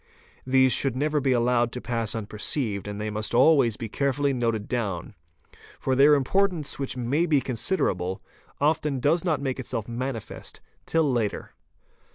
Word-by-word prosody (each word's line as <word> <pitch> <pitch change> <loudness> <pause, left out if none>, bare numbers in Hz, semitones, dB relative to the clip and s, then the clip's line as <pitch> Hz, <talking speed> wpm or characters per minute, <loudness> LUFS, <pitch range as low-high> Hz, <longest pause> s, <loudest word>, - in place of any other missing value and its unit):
These 130 0 +4
should 135 +1 +3
never 150 +3 0
be 135 -1 +1
allowed 120 -1 +2
to 125 - -4
pass 115 -2 -2
unper 105 -2 -6
ceived 105 -7 -1
and 105 0 -5
they 105 0 -3
must 110 +2 -2
always 130 -4 +4
be 115 - -5
carefully 140 +3 0
noted 115 -4 -1
down, 105 -6 -3 0.7
for 130 - 0
their 140 +3 +6
importance, 170 +2 0
which 135 -2 -4
may 140 +8 0
be 150 -3 +3
considerable, 110 - -1 0.4
often 150 -2 +1
does 160 +6 +2
not 160 -6 0
make 135 -1 -2
itself 115 -4 -4
manifest 120 -1 -5 0.3
till 165 0 +2
later. 120 -8 -1
130 Hz, 160 wpm, -25 LUFS, 115-145 Hz, 0.7 s, their